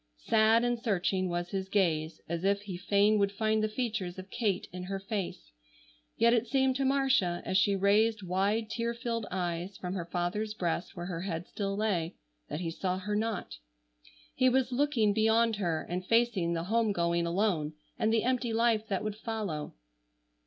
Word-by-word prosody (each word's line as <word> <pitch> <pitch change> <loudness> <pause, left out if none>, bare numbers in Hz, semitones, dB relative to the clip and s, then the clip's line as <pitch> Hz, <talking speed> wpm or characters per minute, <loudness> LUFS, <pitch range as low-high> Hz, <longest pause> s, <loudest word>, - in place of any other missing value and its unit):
Sad 220 - +4
and 240 -1 0
searching 190 -4 0
was 175 0 -2
his 190 0 -3
gaze, 165 -6 0
as 170 +1 -3
if 200 +1 +1
he 195 -3 -6
fain 200 +3 +3
would 200 0 +2
find 215 +1 +1
the 215 - +1
features 215 -6 -3
of 190 +1 -9
Kate 205 -6 -1
in 180 0 -5
her 195 +1 -3
face, 195 - -5 0.7
yet 235 +1 +5
it 235 0 +2
seemed 265 +1 +2
to 275 - 0
Marcia, 265 -10 +2
as - - -2
she 195 +1 +4
raised 210 +2 +3
wide 200 +5 0
tear 235 0 -2
filled 230 -2 -3
eyes 180 +1 -3
from 180 0 -4
her 180 -3 -3
father's 195 +5 -2
breast 175 -3 -2
where 175 - -4
her 175 -2 -4
head 175 -2 -3
still 195 -1 -3
lay, 185 -6 0 0.3
that 155 - -4
he 165 -2 -2
saw 185 +2 -2
her 205 +2 -3
not. 220 - -2 0.7
He 255 0 +4
was 260 0 +1
looking 245 -6 +2
beyond 225 +1 +3
her 170 -5 -1
and 180 +1 -3
facing 220 -5 +2
the 165 -1 -2
home 220 +2 +1
going 170 -1 +1
alone, 170 -4 0 0.3
and 220 - +2
the 225 -1 +2
empty 250 -1 0
life 225 -1 +2
that 195 -1 -1
would 215 -1 -3
follow. 210 - -4
200 Hz, 185 wpm, -30 LUFS, 180-225 Hz, 0.7 s, yet